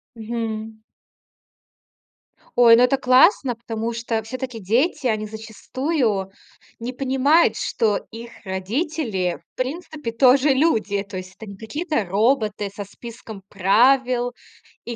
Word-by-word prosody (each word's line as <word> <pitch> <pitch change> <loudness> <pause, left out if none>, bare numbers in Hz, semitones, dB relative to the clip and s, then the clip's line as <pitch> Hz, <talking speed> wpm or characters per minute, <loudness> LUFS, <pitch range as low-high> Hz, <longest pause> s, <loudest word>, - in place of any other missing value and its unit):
Мгм. 220 -1 -5 1.8
Ой, 235 -1 +8
ну, 240 - +5
это 250 +2 +3
классно, 260 - +4
потому 230 0 -4
что 230 -1 -2
всё-таки 250 +1 -6
дети, 250 - 0
они 215 -2 -1
зачастую 220 - -2 0.5
не 240 +2 -5
понимают, 270 +5 +3
что 210 -3 0
их 230 +1 -9 0.2
родители, 195 - -2
в - - -71
принципе, 295 -1 -4
тоже 260 +4 +4
люди. 225 -9 +1
То 200 -1 -8
есть 185 0 -8
это 220 - -11
не 200 - -10
какие-то 230 - -3
роботы 210 +1 0
со 200 +1 -7
списком 220 -1 -11
правил 245 +5 +3 0.5
и 235 - -5
230 Hz, 120 wpm, -22 LUFS, 215-260 Hz, 1.8 s, Ой